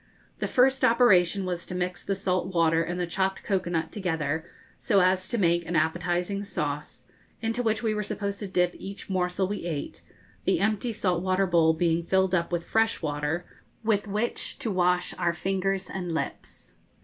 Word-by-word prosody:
The - - -1
first 265 +1 +3
operation 200 -6 +4
was 180 -1 -3
to 180 - -5
mix 180 0 -2
the 195 - -1
salt 185 -2 0
water 165 -1 +4
and 175 +2 -3
the 175 - 0
chopped 190 +2 -1
cocoa 190 -3 0
nut 165 -2 -1
together, 160 -6 -1 0.4
so 200 - +3
as 185 0 +3
to 235 - -2
make 170 -3 +2
an 175 - -2
appetising 175 +5 0
sauce, 150 -7 -4 0.3
into 225 +2 -1
which 220 -1 0
we 220 -1 +1
were 210 - -1
supposed 200 0 -3
to 205 - -4
dip 180 -1 +1
each 195 0 -7
morsel 185 0 0
we 205 -3 -4
ate, 155 -5 -4 0.4
the - - +2
empty 215 +4 +1
salt 185 -5 0
water 185 +1 +2
bowl 165 -3 +4
being 165 0 +1
filled 190 +2 +1
up 170 -1 +1
with 170 -1 -1
fresh 225 -4 +1
water 150 +3 -2 0.4
with 215 -2 +1
which 210 +4 -2
to 225 - -2
wash 180 -1 +2
our 170 -1 +2
fingers 195 +1 -1
and 180 -2 -4
lips. - - -5
185 Hz, 185 wpm, -27 LUFS, 170-200 Hz, 0.4 s, operation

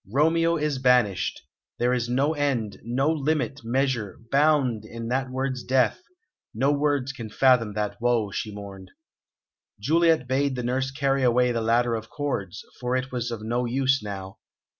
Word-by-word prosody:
"Romeo 165 +5 +3
is 150 -3 -1
banished! 125 -8 +2 0.3
There 125 +1 +1
is 120 -1 -1
no 135 +5 +1
end, 130 -9 -1
no 130 +7 +1
limit, 145 -3 -1
measure, 120 -3 -1
bound, 140 -6 +3
in 115 +1 -7
that 130 +1 -1
word's 130 0 -2
death; 130 - +1 0.5
no 135 +6 +2
words 145 -2 0
can 115 -4 -7
fathom 125 -3 +3
that 105 +2 -3
woe," 120 -4 +1
she 105 - -4
mourned. 100 -2 -9 0.9
Juliet 165 -4 +2
bade 135 +1 +1
the 125 - -3
nurse 130 +2 -1
carry 135 -1 0
away 125 0 +3
the 115 -1 -1
ladder 115 +1 +2
of 110 0 -4
cords, 135 -11 -4
for 125 0 -1
it 130 +1 -2
was 125 -1 -2
of 115 -2 -5
no 120 +3 -1
use 135 +1 +1
now. 95 -2 -7
125 Hz, 160 wpm, -25 LUFS, 115-140 Hz, 0.9 s, Romeo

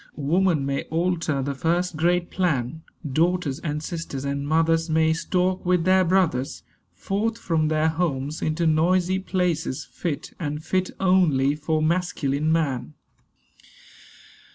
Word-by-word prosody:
Woman 160 0 +1
may 140 0 -2
alter 165 -4 -1
the 140 +1 -2
first 170 +4 0
great 175 +2 +1
plan. 160 -5 -1 0.3
Daughters 160 0 0
and 150 -2 -3
sisters 160 -5 -5
and 140 0 -2
mothers 165 +1 +2
May 160 0 +3
stalk 180 +2 0
with 180 -1 +2
their 185 +1 +4
brothers 170 -8 0 0.3
Forth 220 +4 -2
from 160 -7 0
their 155 0 +2
homes 155 -3 -1
into 155 +2 0
noisy 175 +4 +2
places 180 -7 -1
Fit 165 -5 -4
(and 150 -2 -4
fit 185 +1 0
only) 170 -8 +3
for 155 +1 -1
masculine 155 -3 0
man. 140 - -1
160 Hz, 130 wpm, -24 LUFS, 150-180 Hz, 0.3 s, their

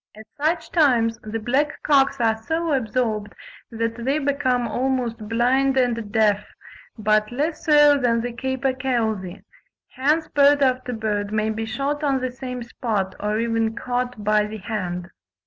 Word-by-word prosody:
At 215 - -11
such 320 +3 -1
times 240 -8 +3
the 215 +1 -4
black 265 +7 -1
cocks 275 -2 +3
are 225 -2 +2
so 320 +8 -2
absorbed 220 -4 -1 0.4
that 230 0 -3
they 270 +4 +1
become 265 -4 0
almost 245 -3 -2
blind 260 +4 +2
and 230 -4 0
deaf, 210 -2 +2 0.5
but 215 0 +1
less 300 +6 -2
so 295 -2 +6
than 230 -2 +2
the 240 0 -4
capercailzie: 250 -7 -2 0.5
hence 300 +5 0
bird 285 0 +4
after 255 -1 +1
bird 210 -2 -2
may 215 0 0
be 220 +1 -3
shot 285 +5 -2
on 275 -2 +2
the 255 0 -3
same 250 -1 -6
spot, 220 -4 -2
or 210 +1 -1
even 225 -1 0
caught 245 -2 -3
by 210 0 +2
the 215 +1 -7
hand. 185 -4 -4
240 Hz, 150 wpm, -23 LUFS, 220-270 Hz, 0.5 s, so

